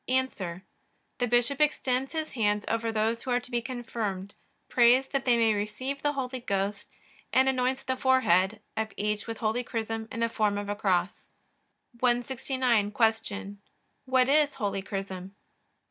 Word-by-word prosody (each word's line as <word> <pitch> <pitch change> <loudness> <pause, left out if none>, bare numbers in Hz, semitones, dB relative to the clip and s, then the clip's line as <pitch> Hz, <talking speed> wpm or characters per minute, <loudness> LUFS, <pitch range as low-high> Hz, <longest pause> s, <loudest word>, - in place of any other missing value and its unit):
A. 260 +1 +3 1.0
The 245 - +1
bishop 245 +4 +2
extends 270 -3 +1
his 315 -1 -3
hands 210 -3 0
over 230 0 0
those 225 +1 0
who - - -7
are 245 0 +3
to 250 +1 -12
be 240 -1 0
confirmed, 225 -5 -4 0.3
prays 250 +2 +5
that 275 -1 -1
they 245 -2 +4
may 225 -1 +4
receive 215 +7 -3
the 290 0 +1
Holy 260 -2 -3
Ghost, 200 -3 -2 0.4
and 260 +1 +4
anoints 260 0 +1
the 260 - -1
forehead 220 -6 +3
of 220 -1 -2
each 210 +1 -1
with 225 -1 -4
holy 225 +3 0
chrism 225 -2 -3
in 230 - -4
the 230 - +3
form 210 -3 0
of 205 0 -4
a 205 - -1
cross. 185 -2 0 0.7
169. 245 -2 +1 0.3
Q. 205 -1 -6 0.5
What 260 -1 +3
is 290 +1 +3
holy 200 -2 -2
chrism? 195 -1 -6
230 Hz, 160 wpm, -28 LUFS, 205-260 Hz, 1.0 s, prays